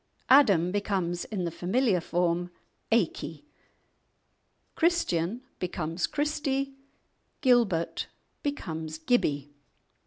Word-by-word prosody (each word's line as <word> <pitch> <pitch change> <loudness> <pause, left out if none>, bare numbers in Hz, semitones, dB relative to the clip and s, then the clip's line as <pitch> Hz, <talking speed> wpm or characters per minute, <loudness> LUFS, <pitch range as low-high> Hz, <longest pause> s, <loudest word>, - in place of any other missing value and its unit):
"Adam" 200 - +6
becomes, 190 -4 -1
in 200 -4 -3
the 170 - -2
familiar 185 +3 +1
form, 175 +1 0 0.4
"Aicky," - - 0 1.3
"Christian" 245 - +1 0.2
becomes 175 -1 -2
"Christy," 285 -2 -1 0.7
"Gilbert" 235 - +2 0.3
becomes 160 - -4
"Gibby." 145 - 0
180 Hz, 80 wpm, -28 LUFS, 170-255 Hz, 1.3 s, Adam